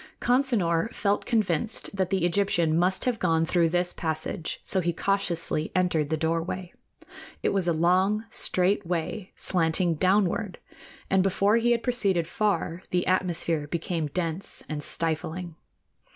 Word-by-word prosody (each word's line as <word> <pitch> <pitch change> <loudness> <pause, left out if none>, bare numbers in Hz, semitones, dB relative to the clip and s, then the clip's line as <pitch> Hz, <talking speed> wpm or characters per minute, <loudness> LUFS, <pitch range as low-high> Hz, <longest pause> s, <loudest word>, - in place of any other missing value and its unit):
Consinor 230 -8 +2
felt 200 0 -1
convinced 215 -2 0
that 190 -2 0
the 190 -3 +1
Egyptian 175 -3 +1
must 180 +3 +1
have 245 -4 0
gone 165 -2 +2
through 170 0 +2
this 175 +1 0
passage, 160 +1 -3
so 190 - +2
he 175 -1 0
cautiously 170 -5 -1
entered 170 -5 +1
the 160 - 0
doorway. 165 +3 -2 0.7
It - - +2
was 190 -3 0
a - - +3
long, 185 +6 +2
straight 190 +3 +1
way, 175 +3 -3
slanting 170 0 +1
downward, 185 +2 +1 0.5
and 190 0 +4
before 200 +3 +2
he 235 +1 +2
had 235 -1 +2
proceeded 200 -9 +1
far, 185 -3 -1
the 180 -1 0
atmosphere 170 -4 0
became 165 0 -2
dense 170 +3 -3
and 155 -1 -4
stifling. 165 +3 -3
180 Hz, 140 wpm, -26 LUFS, 165-200 Hz, 0.7 s, and